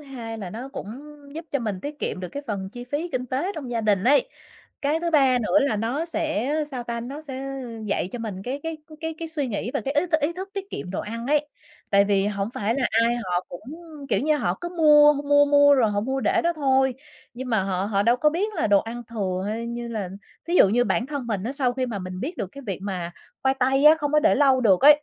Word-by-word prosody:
hai 240 -6 -7
là 190 -4 -6
nó 240 +7 -7
cũng 270 - -7 0.5
giúp 325 +1 -6
cho 280 - +2
mình 210 -6 -3
tiết 295 +4 -6
kiệm - - -3
được 180 - -5
cái 285 +10 -6
phần 195 -4 -3
chi 245 +3 -8
phí 290 +7 -3
kinh 255 -6 -3
tế 275 +11 -2
trong 280 -6 -6
gia 235 -1 -1
đình 205 -3 +1
ấy, 285 - +4 0.5
cái 295 +3 +1
thứ 340 0 -1
ba 270 -5 +4
nữa 235 +6 +3
là 275 -6 +1
nó 235 +9 -1
sẽ, 310 -6 -1 0.2
sao 255 -3 -4
ta, 235 0 -4
nó 275 +6 -7
sẽ 270 -2 -6 0.4
dạy 200 -3 -1
cho 245 - -4
mình 210 -5 -5
cái 260 +6 -4
cái 325 0 -4 0.2
cái 320 0 -3
cái 330 - -5
suy 305 -4 -1
nghĩ 225 0 -3
và - - +1
cái 275 +1 -3
ý 295 +5 +2
t 345 - -18
ý 295 +3 0
thức 380 +3 -7
tiết 395 -1 -6
kiệm 180 - -6
đồ 190 - -2
ăn 230 +2 -6
ấy. 295 +1 +1 0.4
Tại 200 0 +5
vì 200 -1 +2
hổng 200 0 -2
phải 215 +3 0
là 270 -3 +1 0.2
ai 235 +1 +2
họ 180 -6 -1
cũng, 175 - -8 0.5
kiểu - - +2
như, 305 +2 +2
họ - - 0
cứ 345 - -4
mua, 300 -4 +6
h 285 -1 -4
mua, 290 0 +5
mua 285 0 +6
rồi 235 -6 +3
họ 205 0 0
mua 265 +5 -2
để - - +2
đó 340 - +2
thôi, 265 -4 +2 0.4
nhưng 255 +1 -6
mà 225 -5 +2
họ 190 -1 -1
họ 200 -1 +1
đâu 235 +4 +3
có 300 +4 +3
biết 405 +7 -2
là 320 - 0
đồ 205 -1 +5
ăn 235 +2 -6
thừa 190 -5 -2
hay 225 +2 -3
như 235 0 -5
là 215 -5 -3 0.4
thí 345 - -1
dụ 205 - +7
như 245 +5 +2
bản 240 - 0
thân 280 -3 -4
mình 210 -4 -2
á, 245 - -2
sau 265 -3 0
khi 255 0 -2
mà 225 -5 -4
mình 185 0 -6
biết 320 - -4
được 200 - -3
cái 280 - -10
việc 195 -3 -3
mà 180 -4 -4 0.3
khoai 265 0 +3
tây 265 +2 +2
á, 305 +1 +9
không 290 -2 -2
có 300 - +5
để - - +4
lâu 270 -3 +4
được 195 -7 +4
ấy, 295 +1 +7
255 Hz, 270 wpm, -24 LUFS, 215-295 Hz, 0.5 s, á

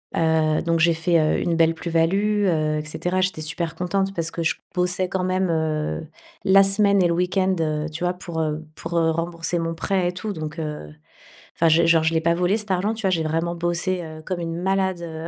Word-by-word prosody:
Heu, 160 -1 +2
donc 165 -1 0
j'ai 170 +1 +4
fait, 165 +1 +2
heu, 155 0 +2
une 170 -1 0
belle 165 0 +3
plus-value, 195 +6 +1
heu 155 -3 +1
et 150 - -6
cetera. 180 +4 -2
J'étais 185 -4 -1
super 160 +2 -1
contente 195 +2 -1
parce 165 -3 -2
que 170 - -3
je 160 - +1 0.2
bossais 180 0 +1
quand 190 -1 -1
même, 185 0 0
heu, 155 -1 -1 0.4
la 195 +1 +6
semaine 200 0 +4
et 175 - +4
le 170 - +1
week-end, 185 +2 +1
heu, 155 -1 -1
tu 160 +3 -6
vois? 180 - +1
Pour, 175 -2 -6
heu, 155 0 -2
pour, 165 +2 -4
heu, 165 -1 +3
rembourser 165 +1 -2
mon 165 0 -2
prêt 185 +1 0
et - - -3
tout, 205 +4 -4
donc 155 -1 -6
heu, 150 - -6 0.6
enfin 165 - +2
je 165 +1 +4
genre, 165 -1 +4
je 160 +1 +1
l'ai 160 - +1
pas 170 +1 +2
volé 180 +4 +1
cet 210 -1 -4
argent, 195 +4 +1
tu 220 - -7
vois? 190 - +1
J'ai 165 -3 +1
vraiment 165 +2 -1
bossé, 175 +1 -1
heu, 155 -1 -9
comme 185 0 -4
une 165 -1 -4
malade 190 -1 0
heu 160 -1 -6
170 Hz, 230 wpm, -23 LUFS, 160-185 Hz, 0.6 s, la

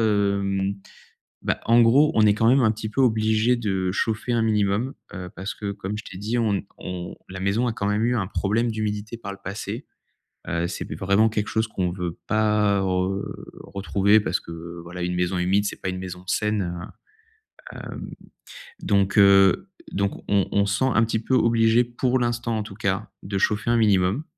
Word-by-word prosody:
hem, 100 -2 +1 0.7
bah, - - -1
en 115 +1 +6
gros, 135 +7 +5
on 110 - +5
est 105 - +5
quand 115 +2 +2
même 130 +1 +5
un 110 - +4
petit 110 0 -5
peu 110 - -2
obligés 110 -1 +3
de 95 -5 -1
chauffer 110 +4 -1
un 115 -1 +2
minimum, 105 +3 +1 0.2
heu, 90 -1 -6
parce 95 +1 -4
que, 100 -2 -4
comme 100 +1 -5
je 105 - -6
t'ai 95 - -9
dit, 110 +4 -2
on 110 -3 +2
ne 95 - 0 0.2
on 90 -1 -6
la 95 - -7
maison 100 +6 +1
a - - -1
quand 100 -3 -3
même 105 +2 +1
eu 120 +1 +2
un 105 -4 -1
problème 110 +4 0
d'humidité 110 +1 -3
par 115 -3 -7
le 100 - -11
passé. 105 +5 -5 0.6
Heu, 85 0 0
c'est - - -6
vraiment 100 +3 +3
quelque 105 -1 -2
chose 110 0 0
qu'on 90 -4 -1
veut 90 -2 -4
pas 105 -2 +2
re 95 +1 0 0.4
retrouver 100 +2 +2
parce - - -1
que, 85 +1 -9
voilà, 85 +1 -7
une 90 0 -1
maison 90 +1 0
humide, 95 +3 +2
c'est - - -5
pas 95 - -1
une 95 - -5
maison 90 -1 -7
saine, 100 -3 0 1.0
heu, - - -9
hem - - -7 0.7
donc 100 0 +1
heu 100 - +5 0.2
donc 100 0 -2
on 100 -2 +2
on 100 0 +2
se 100 0 0
sent 130 0 +2
un 110 - +4
petit 115 0 0
peu 115 +4 -3
obligés, 115 0 +4
pour 125 +1 0
l'instant, 120 -1 -1
en - - -2
tout 105 -2 -10
cas, 100 0 -2
de 100 0 -3
chauffer 105 +3 +1
un 120 - +3
minimum, 100 +3 +2
105 Hz, 200 wpm, -24 LUFS, 95-110 Hz, 1.0 s, en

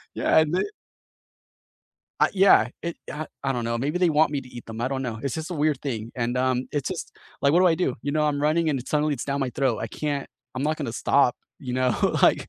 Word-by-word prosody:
yeah - - +4
and 155 +1 +1
they 185 - +2 1.6
I - - +5
yeah, 190 - +5
it, 170 0 -4 0.2
uh 155 +1 -5 0.2
I 135 - 0
don't 120 -2 -2
know, 115 0 -1
maybe 145 +7 -1
they 180 -2 +3
want 155 0 +4
me 145 -2 -1
to 125 - -13
eat 120 -1 -10
them, 110 0 -7
I 120 - 0
don't 135 0 -2
know. 115 -3 -4
It's 135 -3 -2
just 160 +2 -5
a 175 - -3
weird 150 -2 +1
thing, 115 -5 -4
and, 120 0 -1
um, 130 0 0
it's 145 -3 -1
just - - -5 0.3
like, 140 - +3
what 175 - +5
do 185 - +5
I 165 - +5
do? 160 -7 0
You 145 - -2
know, 155 - +1
I'm 145 -1 0
running 155 +2 +2
and 130 -3 -3
suddenly 150 0 +1
it's 120 - -5
down 140 0 -2
my 130 - -1
throat, 130 -4 0
I - - -2
can't 145 +4 -3 0.3
I'm 130 - -3
not 155 +1 0
gonna 115 - -4
stop, 130 -2 +2 0.2
you 125 -2 -5
know? 130 -2 +2 0.3
Like - - +4
140 Hz, 255 wpm, -25 LUFS, 125-155 Hz, 1.6 s, I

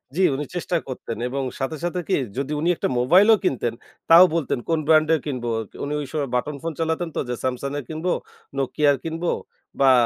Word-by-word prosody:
জ্বি, 190 - +2
উনি 150 +2 -3
চেষ্টা 175 0 0
করতেন। 125 -3 -5
এবং 135 +1 -2 0.2
সাথে, 140 +4 -2
সাথে, 175 +1 -1
কি 190 - +2 0.2
যদি 140 +2 -2
উনি 165 +3 +1
একটা - - -1
মোবাইলও 185 - +6
কিনতেন 125 -9 0 0.4
তাও 165 +2 +10
বলতেন 155 -6 0
কোন 165 -1 +2
ব্র্যান্ডের 155 0 +5
কিনব। 130 -5 -3 0.4
উনি 145 - -2
ওই - - -4
সময় 145 -4 -2
বাটন 145 +4 -1
ফোন 165 - -2
চালাতেন 165 +1 -1
তো - - 0
যে 125 - -1
Samsung 130 +2 -2
এর - - -7
কিনবো, 160 +3 -2 0.5
Nokia 140 +2 +2
র - - -8
কিনবো 165 +1 -2 0.5
বা 135 -1 +6
155 Hz, 195 wpm, -23 LUFS, 135-165 Hz, 0.5 s, তাও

